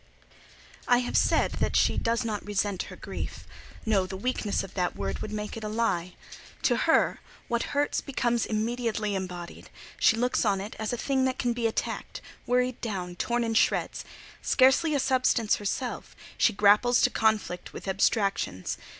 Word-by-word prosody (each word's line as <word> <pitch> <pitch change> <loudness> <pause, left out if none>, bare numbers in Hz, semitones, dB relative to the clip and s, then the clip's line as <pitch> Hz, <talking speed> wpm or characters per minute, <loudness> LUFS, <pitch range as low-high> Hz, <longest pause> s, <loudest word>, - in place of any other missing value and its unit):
I 245 - +5
have 245 - -4
said - - +3
that - - 0
she - - +3
does 230 0 0
not 215 -2 -3
resent 205 -2 -1
her - - -9
grief. - - -6 0.4
No; 200 -4 +2
the 190 - -6
weakness 215 -1 -1
of 195 - -10
that 180 -2 -1
word 95 -1 -3
would 215 - -5
make 210 0 -4
it 225 - -7
a 215 - -3
lie. 195 -6 -1 0.5
To - - +3
her, - - +2 0.3
what 235 +4 -2
hurts 290 0 +1
becomes 240 -4 0
immediately 220 -1 -1
embodied: 180 -2 -6 0.3
she 225 - +4
looks 250 +2 +1
on 200 -3 +2
it 205 +3 -6
as 220 -1 -2
a 245 - -2
thing 265 +1 +1
that 260 -1 -1
can 240 -1 0
be 235 -1 0
attacked, 220 - -3 0.3
worried 250 0 +1
down, 185 -6 -4
torn 240 +6 0
in 225 -1 -1
shreds. 225 - +1 0.4
Scarcely 280 +4 +4
a - - +2
substance 255 -4 +2
herself, 240 +5 -4 0.2
she - - +3
grapples 210 +4 +4
to - - +4
conflict 215 -5 0
with - - -9
abstractions. 195 - 0
220 Hz, 170 wpm, -27 LUFS, 200-245 Hz, 0.5 s, I